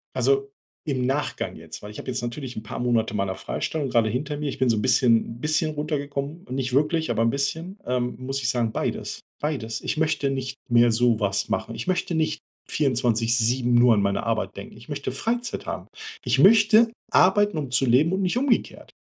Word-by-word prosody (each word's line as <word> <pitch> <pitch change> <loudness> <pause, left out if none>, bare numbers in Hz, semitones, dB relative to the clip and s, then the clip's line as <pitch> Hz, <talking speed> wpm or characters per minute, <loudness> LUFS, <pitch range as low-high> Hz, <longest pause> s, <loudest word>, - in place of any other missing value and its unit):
Also 415 0 +1 0.3
im 130 -5 -1
Nachgang 140 +3 -2
jetzt, - - -10
weil 105 - -8
ich 105 - -10
habe - - -8
jetzt 125 0 -3
natürlich 120 +2 -5
'n 110 - -5
paar 110 - -7
Monate 115 -3 0
meiner 100 -2 -1
Freistellung 140 +8 -3
gerade 115 -2 +3
hinter 140 +6 -3
mir. 150 -1 -2
Ich - - -5
bin 130 - +2
so 110 - +2
'n 105 - -1
bisschen 115 -2 +3
'n - - -14
bisschen 155 +1 0
runtergekommen, 145 +2 -4
nicht 130 0 -2
wirklich, 150 +1 +1
aber 115 -1 +1
'n 115 - +3
bisschen. 160 - -3
Ähm, 125 -1 -1
muss 135 +2 -3
ich 115 - 0
sagen, 120 -3 0
beides, - - -3 0.2
beides. 115 -7 -3
Ich - - -2
möchte 155 -3 +1
nicht 135 0 -4
mehr 120 0 +5
sowas 110 -4 +1
machen. - - -2
Ich - - -6
möchte 180 -2 -1
nicht 155 -1 0 0.3
24/7 120 -2 +1
nur 120 -1 +6
an 100 - +2
meine 100 0 0
Arbeit 115 -1 -2
denken. - - -9
Ich - - -15
möchte - - -4
Freizeit 240 +1 -3
haben. - - -5 0.4
Ich - - +1
möchte 220 +2 +6 0.2
arbeiten, 205 -1 +4
um 135 -4 -4
zu 130 +2 +2
leben, 140 +9 +4
und 190 - 0
nicht 185 +4 0
umgekehrt. 260 -2 0
130 Hz, 200 wpm, -24 LUFS, 120-155 Hz, 0.4 s, nur